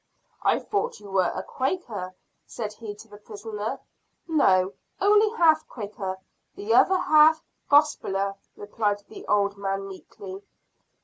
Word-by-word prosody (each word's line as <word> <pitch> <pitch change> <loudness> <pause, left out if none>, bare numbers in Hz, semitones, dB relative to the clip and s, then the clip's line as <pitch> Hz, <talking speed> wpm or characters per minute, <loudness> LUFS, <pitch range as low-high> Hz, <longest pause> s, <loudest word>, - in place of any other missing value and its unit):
"I - - +3
thought 445 +4 -2
you 205 -2 -12
were 190 -1 +2
a - - -3
Quaker," 235 - -3 0.3
said 215 -3 -5
he 210 -1 -8
to 220 - -14
the 205 -1 -14
prisoner. 215 +3 -6 0.5
"No, 195 - +3 0.3
only 420 +2 +5
half 315 -2 +4
Quaker; 200 -4 -5 0.4
the 210 +3 -1
other 375 +10 +5
half 315 -1 +5 0.3
gospeller," 200 -10 +3 0.2
replied 205 0 -2
the - - -11
old 200 -1 +1
man 195 0 -2
meekly. 195 0 -10
210 Hz, 130 wpm, -25 LUFS, 200-300 Hz, 0.5 s, only